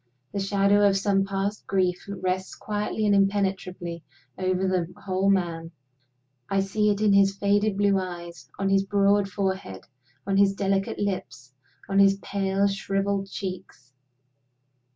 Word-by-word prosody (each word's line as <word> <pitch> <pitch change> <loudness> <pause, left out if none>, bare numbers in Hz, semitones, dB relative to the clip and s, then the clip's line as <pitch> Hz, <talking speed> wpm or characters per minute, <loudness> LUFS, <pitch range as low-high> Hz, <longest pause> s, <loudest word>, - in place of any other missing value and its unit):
The 200 - -2
shadow 200 +1 +2
of 195 - +1
some 195 0 +1
past 195 +1 -3
grief 185 -1 0
rests 185 -1 -3
quietly 210 +1 -2
and 205 - +3
impenetrably 190 -4 0 0.3
over 185 +2 0
the 180 -2 -1
whole 190 0 0
man; 170 -4 0 0.8
I 195 0 +2
see 210 +2 +1
it 205 0 0
in 210 -2 +4
his 195 0 +4
faded 205 0 +1
blue 200 -1 +3
eyes, 175 -2 -8
on 195 0 0
his 195 0 +3
broad 200 0 +2
forehead, 190 - -3 0.4
on 195 0 0
his 195 0 +4
delicate 195 -1 -1
lips, 185 -10 -4 0.3
on 195 0 +1
his 195 0 +6
pale 195 0 0
shriveled 195 0 -1
cheeks. 180 -10 -7
195 Hz, 140 wpm, -25 LUFS, 185-200 Hz, 0.8 s, his